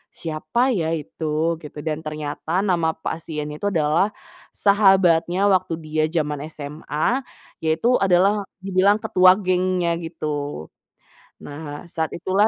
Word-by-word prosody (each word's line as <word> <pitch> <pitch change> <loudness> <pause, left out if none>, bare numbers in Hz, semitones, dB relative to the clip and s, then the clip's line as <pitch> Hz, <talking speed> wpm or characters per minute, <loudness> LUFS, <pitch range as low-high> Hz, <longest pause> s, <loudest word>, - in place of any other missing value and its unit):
"Siapa 165 +11 -1
ya 165 -7 0
itu?" 160 +2 -2
Gitu. 150 - -11
Dan 155 -1 -2
ternyata 155 +3 -3
nama 170 -5 +1
pasiennya 150 -2 -5
itu 205 - -1
adalah 165 +3 +1 0.4
sahabatnya 195 -2 +4
waktu 185 -2 +1
dia 155 0 -1
jaman 150 -3 -1
SMA, 155 - -2 0.4
yaitu 160 +11 +2
adalah, 195 +2 +3 0.2
dibilang 195 +1 +3
ketua 185 0 +6
gengnya 185 -3 0
gitu. 150 - -5 0.7
Nah, 145 0 -7
saat 160 -1 -2
itulah 190 +5 +2
165 Hz, 115 wpm, -22 LUFS, 155-190 Hz, 0.7 s, ketua